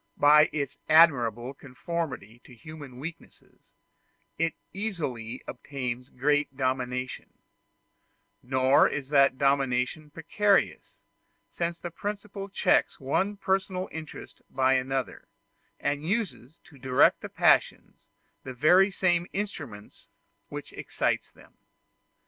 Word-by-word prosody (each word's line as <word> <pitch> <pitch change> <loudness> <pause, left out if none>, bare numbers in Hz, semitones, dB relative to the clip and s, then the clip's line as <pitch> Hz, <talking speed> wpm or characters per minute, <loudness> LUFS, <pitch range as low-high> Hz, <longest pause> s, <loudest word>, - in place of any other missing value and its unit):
By 150 +1 +6
its 140 -3 -4
admirable 130 -7 +4
conformity 135 -4 -6
to 125 - -14
human 145 0 -11
weaknesses, 160 +5 -11 0.6
it 165 0 -1 0.2
easily 140 - -4
obtains 125 -3 -5
great 145 +1 0
dominion; 130 -1 -3 1.0
nor 130 +1 +4
is 140 -2 -5
that 140 -2 +4
dominion 135 +1 0
precarious, 195 +6 0 0.5
since 170 0 -3
the 175 0 -7
principle 200 +1 -6
checks - - +1
one 190 +10 -1
personal 190 -1 -1
interest 155 -1 -9
by 130 0 +2
another, 130 0 -2 0.5
and 145 +1 -2
uses, 170 - -3
to 140 - -18
direct 130 0 +3
the - - -7
passions, - - +1 0.4
the 130 -1 -7
very 180 +9 +5
same 175 -3 +1
instrument 120 - -6 0.4
which - - -8
excites - - -2
them. - - -20
145 Hz, 105 wpm, -27 LUFS, 130-170 Hz, 1.0 s, By